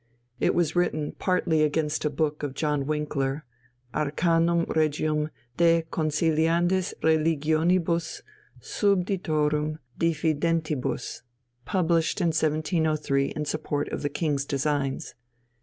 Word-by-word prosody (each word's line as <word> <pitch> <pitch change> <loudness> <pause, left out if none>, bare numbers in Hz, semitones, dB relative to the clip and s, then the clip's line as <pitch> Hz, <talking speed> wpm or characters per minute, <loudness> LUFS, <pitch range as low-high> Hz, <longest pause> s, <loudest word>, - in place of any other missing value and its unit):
It - - +2
was 170 -2 +1
written 155 -4 0
partly 180 -4 +1
against 155 0 0
a - - +3
book 150 +1 -1
of 145 -2 -4
John 150 -1 0
Winckler, 150 -2 -1 0.5
Arcanum 165 +3 +2
Regium 155 0 0 0.3
de 170 -1 +4
conciliandis 165 +3 +1
religionibus 160 +2 +1 0.4
subditorum 155 -6 0 0.2
diffidentibus, 160 -4 -1 0.4
published 170 -1 +1
in 175 -3 +2
1703 155 -2 +1
in 150 +1 -4
support 145 -1 -2
of - - -4
the 145 - -1
King's 145 -2 -1
designs. 140 -1 -1
155 Hz, 100 wpm, -26 LUFS, 150-165 Hz, 0.5 s, de